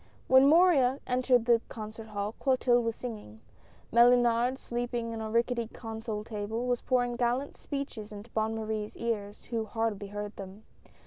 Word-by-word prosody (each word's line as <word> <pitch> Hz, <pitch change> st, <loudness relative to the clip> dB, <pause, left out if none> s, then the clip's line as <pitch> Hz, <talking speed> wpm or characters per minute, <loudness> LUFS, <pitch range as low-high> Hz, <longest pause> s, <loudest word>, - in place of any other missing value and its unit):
When 260 Hz, +1 st, +7 dB
Morin 290 Hz, -5 st, +5 dB
entered 250 Hz, -1 st, +2 dB
the 235 Hz, -1 st, +4 dB
concert 220 Hz, 0 st, -8 dB
hall, 205 Hz, -1 st, -3 dB
Clotilde 250 Hz, -3 st, +3 dB
was 230 Hz, -1 st, -1 dB
singing; 210 Hz, -, -8 dB, 0.5 s
Mellunard, 240 Hz, +1 st, +5 dB
leaning 240 Hz, -1 st, -2 dB
on 225 Hz, -, -5 dB
a 220 Hz, -, -4 dB
rickety 235 Hz, +1 st, 0 dB
console 225 Hz, -2 st, -6 dB
table, 220 Hz, +2 st, -4 dB
was 245 Hz, -1 st, 0 dB
pouring 245 Hz, -2 st, +1 dB
gallant 245 Hz, +4 st, 0 dB
speeches 275 Hz, -7 st, -6 dB
into 210 Hz, +2 st, -10 dB
Bonne 220 Hz, 0 st, 0 dB
Marie's 215 Hz, -1 st, -4 dB
ears, 210 Hz, -3 st, -3 dB
who 225 Hz, -2 st, -1 dB
hardly 215 Hz, -2 st, -2 dB
heard 205 Hz, +1 st, -6 dB
them. 195 Hz, +2 st, -9 dB
230 Hz, 150 wpm, -29 LUFS, 215-245 Hz, 0.5 s, When